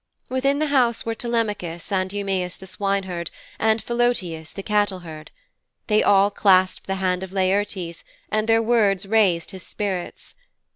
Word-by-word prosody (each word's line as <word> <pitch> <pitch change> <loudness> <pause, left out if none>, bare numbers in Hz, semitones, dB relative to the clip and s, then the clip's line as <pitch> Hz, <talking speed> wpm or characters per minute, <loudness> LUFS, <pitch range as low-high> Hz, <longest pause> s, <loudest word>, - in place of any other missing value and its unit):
Within 275 +2 +1
the 305 0 0
house 240 -4 +2
were 230 - -1
Telemachus, 210 -8 -3
and 190 -1 0
Eumæus 190 -3 -2
the 190 - -11
swineherd 190 -3 -2 0.3
and 220 0 +1
Philœtius 220 -10 0
the 195 - -7
cattleherd. 185 -7 -1 0.6
They 215 -2 +3
all 200 0 +4
clasped 185 -2 +3
the 195 - -1
hand 185 -1 0
of 190 -1 -6
Laertes 190 -2 -1 0.3
and 215 +1 0
their 225 0 +4
words 210 -5 +2
raised 195 -5 +2
his 190 - -9
spirits. 190 -3 -5
195 Hz, 145 wpm, -23 LUFS, 185-220 Hz, 0.6 s, all